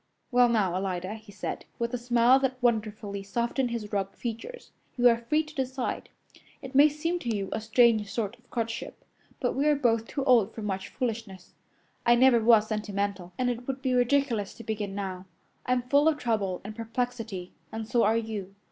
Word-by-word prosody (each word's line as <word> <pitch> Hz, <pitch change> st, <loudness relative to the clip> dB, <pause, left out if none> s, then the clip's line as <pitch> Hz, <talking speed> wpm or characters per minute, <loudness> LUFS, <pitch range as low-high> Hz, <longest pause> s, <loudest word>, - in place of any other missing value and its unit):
"Well, 245 Hz, -1 st, +5 dB
now, 210 Hz, -6 st, +2 dB
Alida," 185 Hz, +1 st, -2 dB
he 220 Hz, -2 st, -11 dB
said, 200 Hz, -, -5 dB
with 235 Hz, +1 st, -2 dB
a -, -, +1 dB
smile 240 Hz, +2 st, +4 dB
that 265 Hz, -1 st, -1 dB
wonderfully 215 Hz, -4 st, -1 dB
softened 235 Hz, +5 st, -1 dB
his 220 Hz, -3 st, -5 dB
rugged 195 Hz, -1 st, -2 dB
features, 240 Hz, -, -6 dB, 0.3 s
"you 245 Hz, 0 st, +6 dB
are 230 Hz, -1 st, +4 dB
free 300 Hz, +7 st, +1 dB
to 305 Hz, 0 st, -13 dB
decide. 260 Hz, -2 st, -3 dB, 0.5 s
It 265 Hz, 0 st, -8 dB
may 285 Hz, +3 st, +7 dB
seem 330 Hz, +4 st, -2 dB
to 245 Hz, -, -4 dB
you 195 Hz, -1 st, -3 dB
a 220 Hz, -, -2 dB
strange 220 Hz, -2 st, +3 dB
sort 220 Hz, 0 st, -2 dB
of -, -, -30 dB
courtship, 230 Hz, -1 st, -4 dB, 0.3 s
but -, -, 0 dB
we 280 Hz, +3 st, +1 dB
are 300 Hz, -, +5 dB
both 230 Hz, -5 st, +1 dB
too 275 Hz, -, -3 dB
old 230 Hz, -6 st, +4 dB
for 220 Hz, -, -6 dB
much 195 Hz, -2 st, -3 dB
foolishness. 225 Hz, -6 st, -5 dB, 0.5 s
I 240 Hz, -, +5 dB
never 250 Hz, -1 st, +6 dB
was 225 Hz, -2 st, +6 dB
sentimental, 200 Hz, -4 st, -3 dB
and 250 Hz, -1 st, +1 dB
it 245 Hz, +1 st, -6 dB
would 270 Hz, 0 st, -4 dB
be 260 Hz, -2 st, +1 dB
ridiculous 245 Hz, -4 st, +1 dB
to 230 Hz, -, -10 dB
begin 205 Hz, -3 st, -3 dB
now. 190 Hz, -2 st, -5 dB, 0.4 s
I'm 250 Hz, -1 st, +2 dB
full 285 Hz, +4 st, +3 dB
of 315 Hz, -2 st, +3 dB
trouble 210 Hz, -8 st, -1 dB
and 210 Hz, +2 st, -7 dB
perplexity, 225 Hz, -5 st, -4 dB, 0.2 s
and 220 Hz, -1 st, -5 dB
so 235 Hz, +1 st, +2 dB
are 220 Hz, +2 st, +3 dB
you. 210 Hz, -4 st, -5 dB
230 Hz, 190 wpm, -28 LUFS, 205-250 Hz, 0.5 s, may